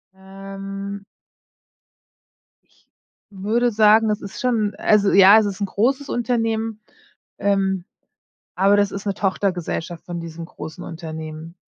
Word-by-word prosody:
Ähm. 195 +1 -8 1.6
Ich - - -34 0.4
würde 215 +5 0
sagen, 220 +1 +5
das 210 -1 -1
ist 200 - -8
schon 225 -5 0
Also 205 -2 +3
ja, 200 +2 +8
es 215 - +1
ist 200 -1 -4
'n - - +2
großes 260 +9 0
Unternehmen. 225 -2 -1 0.6
Ähm, 195 -2 0 0.7
aber 195 +2 +4
das 205 -1 +2
ist 200 +1 -6
'ne 200 - 0
Tochtergesellschaft 180 -3 -2
von 175 -1 -5
diesem 165 0 -7
großen 160 +2 -9
Unternehmen. 160 -1 -7
200 Hz, 125 wpm, -21 LUFS, 185-215 Hz, 1.6 s, ja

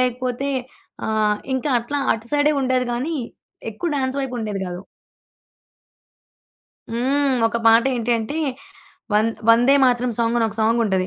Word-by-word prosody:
లేకపోతే 255 +2 -1 0.6
ఆహ్, 215 -1 +1 0.2
ఇంకా 260 +3 -1
అట్లా 240 +5 -3
అటు 225 +1 -6
సైడే 290 0 +3
ఉండేది 255 -1 +1
కానీ, 265 +8 -2 0.6
ఎక్కువ 225 +11 -4
డ్యాన్సు 265 -1 -1
వైపు 265 -2 -4
ఉండేది 210 -3 -3
కాదు. 180 0 -6 2.1
హ్మ్. 265 +4 +1
ఒక 230 +1 -1
పాటేంటి 235 +1 +3
అంటే 225 +7 -4 0.8
'వం 210 +1 +3 0.2
వందేమాతరం' 245 0 +4
సాంగ్ 235 0 +1
అని 225 - +2
ఒక 215 - -8
సాంగ్ 225 +2 +2
ఉంటది. 190 -3 0
240 Hz, 130 wpm, -21 LUFS, 225-265 Hz, 2.1 s, వందేమాతరం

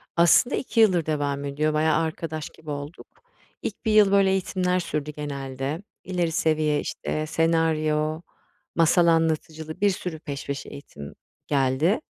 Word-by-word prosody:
Aslında 170 - +5
2 240 -3 -2
yıldır 185 -7 +4
devam 145 -2 -1
ediyor. 150 +2 0
Bayağı 155 0 +2
arkadaş 160 -1 -4
gibi 155 -1 -13
olduk. 145 +3 -7 0.5
İlk 210 - -6
1 220 - +2
yıl, 210 -2 +6
böyle, 195 -1 +4
eğitimler 185 -1 0
sürdü 150 -3 -3
genelde. 140 0 -4 0.2
İleri 175 -3 -1
seviye, 155 -3 +1
işte, 155 +2 -3
senaryo, 155 -1 +1 0.5
masal 170 +1 +4
anlatıcılığı 160 0 0
bir 205 - +5
sürü 180 -4 -4
peş 140 -3 -6
peşe 140 -1 -5
eğitim 75 - -10 0.3
geldi. 140 +7 +2
155 Hz, 140 wpm, -25 LUFS, 150-175 Hz, 0.5 s, yıl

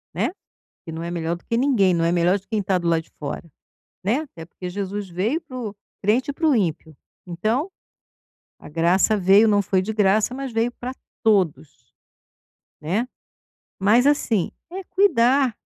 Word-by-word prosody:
Né. - - 0 0.5
Porque 165 - -10
não 165 - -5
é 170 - -4
melhor 170 -1 -2
do 175 - -15
que 230 - -1
ninguém, 235 -8 +3
não 170 -1 +1
é 170 - +2
melhor 175 +2 +3
de 190 - -30
quem 215 -2 -1
tá 190 -1 +1
do 175 -1 -3
lado 165 -1 +2
de - - -28
fora, 145 - -5 0.6
né, 220 +9 +1
até 265 - -9
porque 180 +2 -8
Jesus 200 +1 -4
veio 210 - -1
para 285 -6 -10
o 215 -5 -5 0.3
crente 230 +7 +1
e - - -10
para 320 +3 0
o 295 - +4
ímpio. 160 -6 -1 0.3
Então, 220 - -1 0.9
a - - -12
graça 170 +7 +3
veio, 200 +3 +5
não 205 -1 +4
foi 190 -1 +1
de 215 +4 -3
graça, 210 +2 +2
mas 270 0 -5
veio 225 +1 0
pra 250 +2 -6 0.3
todos, 185 -9 0 0.9
né. 195 +11 -1 0.7
Mas, 215 +6 +4
assim, 250 - +2 0.2
é 380 +2 -6
cuidar 270 - +3
205 Hz, 180 wpm, -23 LUFS, 175-245 Hz, 0.9 s, veio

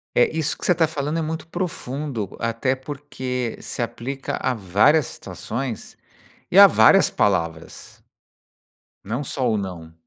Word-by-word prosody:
É 120 - +5
isso 160 -3 -1
que - - -4
você 180 - +4
tá 160 -1 +2
falando 150 +1 -2
é - - 0
muito 160 +1 -4
profundo, 145 - -4
até 115 +3 0
porque, 130 -3 -5
se - - -6
aplica 125 +3 -4
a 130 - +1
várias 110 - +3
situações 120 0 -6 0.5
e - - +1
a - - +12
várias - - +6
palavras. 85 -5 -2 1.0
Não 115 +8 -3
só 130 -2 -1
o 110 - +1
não. 85 -5 -6
130 Hz, 145 wpm, -22 LUFS, 110-145 Hz, 1.0 s, a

